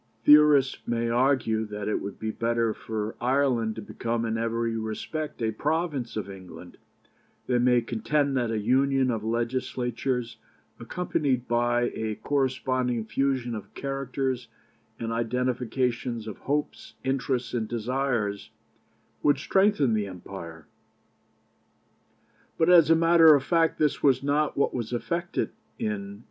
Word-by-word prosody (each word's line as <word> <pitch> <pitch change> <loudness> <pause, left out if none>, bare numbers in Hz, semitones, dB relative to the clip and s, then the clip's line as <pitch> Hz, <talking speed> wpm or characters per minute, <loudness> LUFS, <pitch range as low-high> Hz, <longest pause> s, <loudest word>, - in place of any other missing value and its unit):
Theorists 145 -2 +6
may 115 0 0
argue 120 -3 +2
that 105 -1 -6
it 105 - -1
would 100 0 -6
be 110 0 -3
better 115 0 0
for 110 0 -4
Ireland 125 -4 +1
to 110 - -7
become 115 +2 -3
in 110 0 -1
every 115 0 -1
respect 115 +6 -4
a 110 - +1
province 145 -1 -2
of 105 -3 -3
England; 90 -3 -11 0.7
they 125 -1 +1
may 125 0 +4
contend 135 +5 0
that 120 -3 0
a 115 - -1
union 130 +4 +2
of 110 -2 -3
Legislatures, 120 +1 -2 0.4
accompanied 130 -2 -1
by 120 0 +1
a 110 -1 -3
corresponding 130 -4 -1
fusion 130 -1 -1
of 105 -3 -8
characters 135 -2 -3 0.5
and 115 -1 -3
identification 120 0 -1
of 110 - -7
hopes, 145 +1 -3
interests, 130 -2 -1
and 115 -3 -1
desires, 115 -3 -2 0.7
would 145 -1 +3
strengthen 190 - +2
the 105 -2 0
empire; 85 -3 -9 1.9
but 165 +2 +4
as 170 -3 +7
a 165 - +7
matter 165 -1 +7
of 140 - 0
fact 165 +1 +2
this 150 -2 +1
was 135 -1 +3
not 145 +2 +1
what 140 - +1
was 120 -1 -4
effected 170 +8 -2 0.3
in 220 -3 -1
1800. 200 0 -7
125 Hz, 135 wpm, -27 LUFS, 115-140 Hz, 1.9 s, as